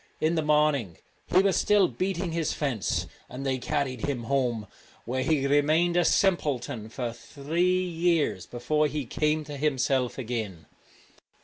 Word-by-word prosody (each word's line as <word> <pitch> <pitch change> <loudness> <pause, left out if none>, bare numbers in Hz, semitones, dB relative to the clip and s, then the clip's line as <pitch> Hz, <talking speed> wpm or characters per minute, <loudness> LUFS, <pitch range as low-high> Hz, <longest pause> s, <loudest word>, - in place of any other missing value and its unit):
In 155 +2 +1
the 160 - +1
morning 150 - +2 0.3
he 185 +2 +4
was 195 -1 +2
still 205 -2 +4
beating 175 +6 -2
his 165 -2 -1
fence, 130 - -1 0.2
and 130 +2 -6
they 130 -1 0
carried 130 -3 -2
him 130 -5 -2
home, 120 -4 0 0.4
where 130 +2 -1
he 140 0 +1
remained 155 +5 +3
a 175 - +4
simpleton 140 - +1
for 120 0 -4
three 170 +9 -1
years 165 - 0
before 150 +5 0
he 150 -2 -3
came 150 +5 0
to 145 -1 -7
himself 135 -3 0
again. 110 - -4
145 Hz, 145 wpm, -27 LUFS, 125-160 Hz, 0.4 s, he